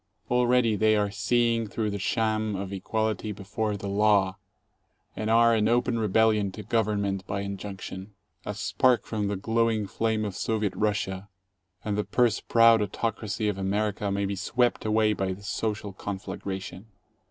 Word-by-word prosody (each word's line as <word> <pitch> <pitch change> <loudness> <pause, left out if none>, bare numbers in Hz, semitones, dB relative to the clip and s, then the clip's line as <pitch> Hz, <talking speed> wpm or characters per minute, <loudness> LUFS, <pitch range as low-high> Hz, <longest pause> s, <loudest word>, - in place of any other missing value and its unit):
Already 125 -2 +3
they 110 +1 +3
are 105 -1 +1
seeing 115 0 +1
through 105 0 -2
the 100 - -4
sham 110 0 0
of 95 0 -5
"equality 110 +2 -2
before 105 +1 -3
the 100 - -6
law," 100 -1 +2 0.8
and 110 0 -3
are 115 +1 +5
in 105 -1 +2
open 120 0 +1
rebellion 110 -1 +2
to 105 - -8
govern 105 -1 0
ment 95 -1 -3
by 100 -1 -2
injunction. 100 0 -7 0.3
A - - -5
spark 125 -2 +2
from 105 -2 -2
the 100 - -1
glowing 110 +1 +1
flame 110 +2 -1
of 100 -3 -4
Soviet 110 -3 -1
Russia, 100 -2 -1 0.6
and 105 -1 -1
the 105 - 0
purse 120 -1 +2
proud 115 -1 +5
autocracy 110 +1 -2
of 100 -2 -1
America 105 +1 -1
may 100 0 0
be 100 0 -2
swept 120 +6 0
away 110 0 +3
by 95 -2 -2
the 100 +2 -12
social 105 -1 -3
conflagration. 95 0 -6
105 Hz, 160 wpm, -27 LUFS, 100-110 Hz, 0.8 s, are